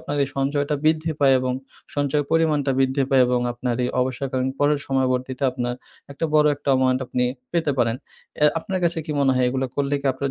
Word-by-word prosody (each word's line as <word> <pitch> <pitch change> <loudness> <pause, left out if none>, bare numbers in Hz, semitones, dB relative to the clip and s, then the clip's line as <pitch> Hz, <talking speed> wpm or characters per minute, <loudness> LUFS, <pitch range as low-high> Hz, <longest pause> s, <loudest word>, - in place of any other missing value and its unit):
আপনার 145 - -4
এই - - -7
সঞ্চয়টা 145 +2 0
বৃদ্ধি 160 +1 +2
পায় 135 -2 +5
এবং 130 0 -1 0.4
সঞ্চয়ের 145 0 0
পরিমাণটা 155 -4 +2
বৃদ্ধি 135 +1 +2
পায় 135 -1 +5
এবং 125 0 +1
আপনার 120 0 -2
এই - - 0
অবসরকালীন 130 0 -1
পরের 145 0 +2
সময়বর্তীতে 130 0 -1
আপনার 120 -1 -3 0.4
একটা 140 - -4
বড়ো 150 0 +5
একটা 145 0 -8
অ্যামাউন্ট 130 -1 +2
আপনি 125 0 0 0.3
পেতে 165 -3 +1
পারেন। 115 -1 +2 0.4
অ্যা 150 - +5
আপনার 185 +3 -3
কাছে 170 -1 +1
কি 155 - -6
মনে 135 -1 +3
হয় 125 0 +2
এগুলা 130 +1 -1
করলে 140 0 0
কি 140 - -3
আপনার 135 +1 -3
135 Hz, 200 wpm, -23 LUFS, 130-145 Hz, 0.4 s, পায়